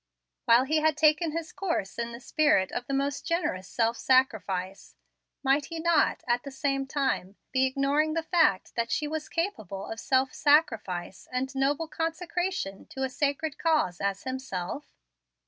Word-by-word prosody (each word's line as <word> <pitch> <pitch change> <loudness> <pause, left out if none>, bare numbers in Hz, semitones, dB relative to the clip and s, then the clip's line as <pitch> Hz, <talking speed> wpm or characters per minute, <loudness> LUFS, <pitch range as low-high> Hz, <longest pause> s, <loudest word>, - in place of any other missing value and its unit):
While 235 +2 +6
he 305 +4 +1
had 310 -1 +2
taken 310 +2 +4
his 330 0 -4
course 335 - -3
in 235 0 -2
the 235 - -8
spirit 255 - +2
of 245 - -4
the 275 - -3
most 275 0 -1
generous 300 - -1
self 230 +2 0
sacrifice, 195 -8 0 0.5
might 275 +1 +3
he 330 +1 -6
not, 335 -1 +2
at 240 0 +2
the 280 - -7
same 275 -1 -1
time, 265 -9 -1 0.2
be 265 0 +3
ignoring 280 +4 +1
the 330 - 0
fact 320 - +2
that 235 0 -1
she 300 - 0
was 310 0 -3
as - - -16
capable 215 - -3
of 225 - -6
self 260 +1 +1
sacrifice 225 - +1
and 255 +1 -2
noble 280 +4 0
consecration 330 - -3
to 265 - -5
a 265 - 0
sacred 290 +2 -1
cause 305 - +1
as 200 0 -1
himself? 260 -3 -5
275 Hz, 165 wpm, -28 LUFS, 235-315 Hz, 0.5 s, While